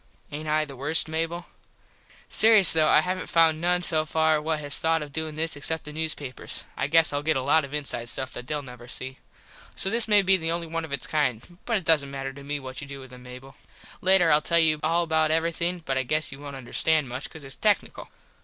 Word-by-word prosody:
Aint 155 +2 -6
I 155 0 +1
the 140 -2 -10
worst, 145 +6 +3
Mable? 165 +2 -3 0.8
Serious 220 -4 +5
though 160 -1 +3
I - - +5
havnt 185 0 -3
found 165 -1 +3
noone 180 +1 +1
so 155 -2 +2
far 160 0 +1
what 160 0 -1
has 145 -1 -1
thought 165 -1 +1
of 145 -1 -11
doin 160 0 -4
this 160 0 -1
except 160 +3 -3
the 150 - -9
newspapers. 150 -4 -3
I - - -1
guess 160 0 +4
Ill 145 - -1
get 155 -1 +1
a 130 - -2
lot 150 +3 +3
of 140 - -8
inside 140 -5 -2
stuff 130 +1 -3
that 125 - -8
theyll 150 0 -3
never 125 -2 -12
see. 130 +1 -6 0.6
So 195 - -1
this 230 0 +2
may 205 -2 +5
be 190 0 +4
the 165 -2 -2
only 170 0 -2
one 165 0 -4
of 155 - -13
its 140 -3 -1
kind. 150 +3 -2
But 230 -2 +1
it 190 - -6
doesnt 150 -4 +4
matter 135 -1 -5
to 140 +1 -12
me 145 +1 -3
what 130 -1 -8
you 145 - -9
do 140 0 -8
with 130 -1 -12
them, 125 0 -12
Mable. 125 +2 -12 0.5
Later 185 -2 +4
Ill 150 +1 +5
tell 170 +2 +1
you 155 -2 +3
all 165 +2 +1
about 160 -1 +1
everything 170 +2 -1
but 135 -1 -1
I - - +2
guess 155 +5 -1
you 135 - -10
wont 145 -1 -8
understand 145 +3 0
much 130 +3 -6
cause 160 - -12
its 135 -1 -9
tecknickle. 210 -1 0
155 Hz, 240 wpm, -25 LUFS, 140-165 Hz, 0.8 s, Serious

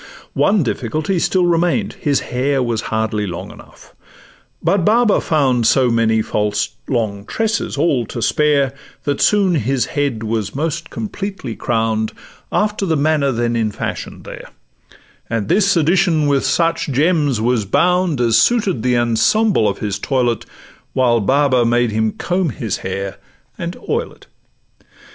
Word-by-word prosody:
One 200 -4 +2
difficulty 155 - -2
still 180 +1 +2
remain'd—his 170 -3 0
hair 130 +2 -1
Was 115 -2 -1
hardly 110 -2 -1
long 85 -2 -6
enough; - - -16 0.7
but 195 -3 +1
Baba 225 +2 +3
found 130 - +2
So 125 -1 +3
many 110 -1 +2
false 105 0 -1 0.2
long 110 -6 -2
tresses 225 - -2
all 125 -9 +1
to - - -6
spare, 140 +2 +2 0.3
That 145 -1 -1
soon 200 -3 +3
his 135 -3 0
head 140 -6 -1
was 110 -1 -3
most 160 +2 -3
completely 195 - -5
crown'd, 110 0 -1 0.4
After 210 -1 0
the 160 -2 +1
manner 145 -1 +2
then 120 -1 -1
in 110 -2 +1
fashion - - -6
there; - - -10 0.8
And 110 -3 -2
this 200 -2 +3
addition 165 -1 +2
with 140 -2 +1
such 165 -1 +1
gems 145 -2 +1
was 115 -1 +1
bound 180 - +1
As 115 -2 +3
suited 205 - +1
the 125 0 +1
ensemble 120 - +2
of - - -1
his 100 -1 -2
toilet, 120 -2 -1 0.5
While 120 -3 +3
Baba 130 +2 +2
made 120 0 +2
him 110 0 0
comb 180 -1 -1
his 115 -7 -3
head 95 +1 -5 0.4
and 170 0 -5
oil 465 +1 -1
it. - - -20
135 Hz, 145 wpm, -18 LUFS, 115-170 Hz, 0.8 s, Baba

